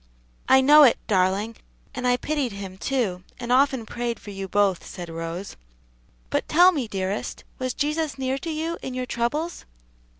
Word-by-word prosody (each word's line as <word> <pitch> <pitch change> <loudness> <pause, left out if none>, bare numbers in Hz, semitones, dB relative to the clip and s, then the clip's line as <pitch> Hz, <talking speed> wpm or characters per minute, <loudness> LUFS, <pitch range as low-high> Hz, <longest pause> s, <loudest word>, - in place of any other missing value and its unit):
"I 265 0 +7
know 295 +3 +8
it, 270 -5 +7
darling, 200 +2 +1 0.4
and 250 -1 -2
I 245 0 +3
pitied 285 -5 -2
him, 195 -2 -7
too, 210 -10 -1 0.2
and 240 0 -4
often 265 -2 +3
prayed 240 0 -3
for 205 - -10
you 195 -1 -5
both," 195 -2 +2
said 175 -2 -8
Rose. 165 +3 -5 0.8
"But - - 0
tell 355 +4 +7
me, 280 -9 -2
dearest, 195 0 -3 0.2
was 255 -1 -2
Jesus 305 0 -1
near 265 0 -1
to 330 - -5
you 325 +2 -3
in 260 - -5
your 255 0 -2
troubles?" 290 +9 -2
245 Hz, 170 wpm, -24 LUFS, 200-280 Hz, 0.8 s, know